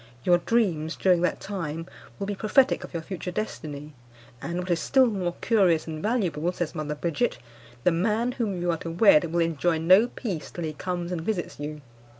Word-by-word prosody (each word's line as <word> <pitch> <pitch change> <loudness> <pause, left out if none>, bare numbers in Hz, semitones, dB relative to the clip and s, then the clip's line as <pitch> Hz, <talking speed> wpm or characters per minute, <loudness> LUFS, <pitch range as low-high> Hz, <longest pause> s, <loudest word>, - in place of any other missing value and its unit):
Your 175 -1 +4
dreams 170 -8 0
during 180 -2 +3
that 180 - 0
time 165 -5 -4 0.3
will 200 - -3
be 205 - -2
prophetic 250 +7 +2
of - - -9
your 170 -2 -4
future 185 0 -5
destiny, 150 -7 -5 0.5
and, 170 +5 -4
what 180 0 -3
is 170 - +2
still 265 - +4
more 185 -7 -1
curious 185 -8 +3
and 155 -1 -6
valuable, 180 -7 0
says 175 -3 -3
Mother 150 -1 -3
Bridget, 170 +10 -1 0.5
the 180 - +4
man 215 +8 +1
whom 215 -7 -2
you 175 0 +1
are 165 - -1
to 165 - -6
wed 170 -2 +5
will 170 0 +1
enjoy 165 0 +1
no 185 +8 +5
peace 200 - -5
till 175 - -6
he 155 -1 -3
comes 175 +2 -4
and 175 -2 -2
visits 175 -3 -3
you. 150 +1 -5
175 Hz, 195 wpm, -26 LUFS, 160-200 Hz, 0.5 s, wed